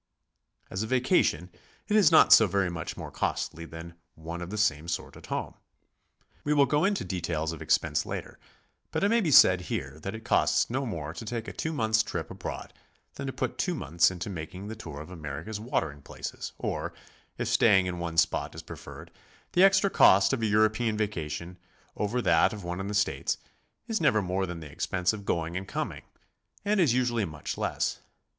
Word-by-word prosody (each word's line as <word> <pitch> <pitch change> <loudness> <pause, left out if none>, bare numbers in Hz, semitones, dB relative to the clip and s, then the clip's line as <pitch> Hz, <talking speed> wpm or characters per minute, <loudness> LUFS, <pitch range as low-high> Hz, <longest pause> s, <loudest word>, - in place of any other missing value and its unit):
As 95 - -2
a 110 - -2
vacation, 125 - +2 0.4
it 210 - +1
is 210 -5 +6
not 160 - +8
so 110 - +8
very 95 -1 0
much 85 - -5
more - - -7
costly 85 0 -2
than 80 +1 -9 0.2
one 85 +2 -7
of 85 - -6
the 105 - -5
same 85 -7 +1
sort 85 - -4
at - - -13
home. - - -3 0.9
We 150 +1 +1
will 140 -1 +6
go 150 +6 +2
into 200 0 0
details 85 -3 -2
of 80 - -8
expense - - +1
later, - - -6 0.5
but - - -2
it 200 - +4
may 230 +1 +3
be 175 - 0
said 90 -9 +7
here 70 +3 -4
that 95 +6 -5
it 110 - -10
costs - - +2
no 135 +1 -1
more 80 -7 -4
to 100 - -7
take 115 +1 -4
a - - -6
two 160 - -3
months' 110 -7 +2
trip - - -5
abroad - - -6 0.4
than - - -6
to - - -2
put - - -3
two - - 0
months 85 +4 +2
into 90 0 -6
making 90 +1 -6
the 110 - -5
tour 75 -9 -8
of 80 - -10
America's 85 +6 -6
watering 80 - -2
places; - - -7
or, - - -3 0.4
if - - -2
staying 95 -4 +4
in 90 -1 -3
one 85 -1 -4
spot 75 - +1
is - - -8
preferred, 80 +4 -10 0.4
th 180 - +4
e - - +8
extra 195 0 +5
cost 95 +5 +6
of 130 - -1
a 110 - +1
European 110 +1 +2
vacation 90 -4 -4 0.4
over 115 +4 -1
that 85 +3 +4
of 105 -3 -7
one 90 +1 -4
in 95 - -3
the 105 - -3
States, 105 - 0 0.5
is 225 -4 -1
never 110 -9 +3
more 95 +1 -1
than 85 -1 -6
the 75 -3 -9
expense 90 +6 0
of 100 -2 -7
going 85 -1 -1
and 95 +1 -4
coming, - - -4 0.6
and 210 0 +2
is 165 -9 +4
usually 120 -3 +1
much 75 -5 -5
less. - - -1
95 Hz, 205 wpm, -28 LUFS, 85-115 Hz, 0.9 s, not